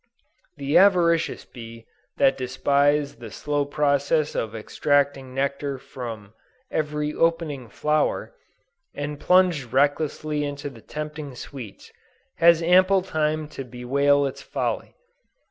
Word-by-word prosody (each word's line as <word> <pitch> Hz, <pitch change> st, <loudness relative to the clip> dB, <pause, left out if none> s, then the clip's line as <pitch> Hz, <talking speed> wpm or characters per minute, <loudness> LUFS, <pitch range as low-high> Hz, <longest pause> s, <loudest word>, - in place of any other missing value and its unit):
The 140 Hz, +1 st, +3 dB
avaricious 175 Hz, -4 st, +3 dB
bee 115 Hz, -1 st, -11 dB, 0.3 s
that 135 Hz, -, +4 dB
despised 140 Hz, +2 st, +1 dB
the 115 Hz, -2 st, -8 dB
slow 145 Hz, +6 st, -2 dB
process 145 Hz, +1 st, +1 dB
of 110 Hz, 0 st, -3 dB
extracting 135 Hz, +3 st, 0 dB
nectar 140 Hz, 0 st, -2 dB
from 115 Hz, -5 st, -8 dB, 0.4 s
"every 150 Hz, -1 st, -1 dB
opening 165 Hz, -7 st, 0 dB
flower," 150 Hz, +6 st, 0 dB, 0.6 s
and 145 Hz, 0 st, -4 dB
plunged 180 Hz, -9 st, +3 dB
recklessly 150 Hz, +2 st, +1 dB
into 145 Hz, 0 st, -5 dB
the 115 Hz, -4 st, -14 dB
tempting 150 Hz, -1 st, -6 dB
sweets, 120 Hz, -5 st, -10 dB, 0.5 s
has 170 Hz, 0 st, +5 dB
ample 185 Hz, +2 st, +5 dB
time 155 Hz, -3 st, -1 dB
to 135 Hz, -, -7 dB
bewail 140 Hz, +3 st, +1 dB
its 135 Hz, -, -5 dB
folly. -, -, -3 dB
145 Hz, 110 wpm, -24 LUFS, 135-155 Hz, 0.6 s, has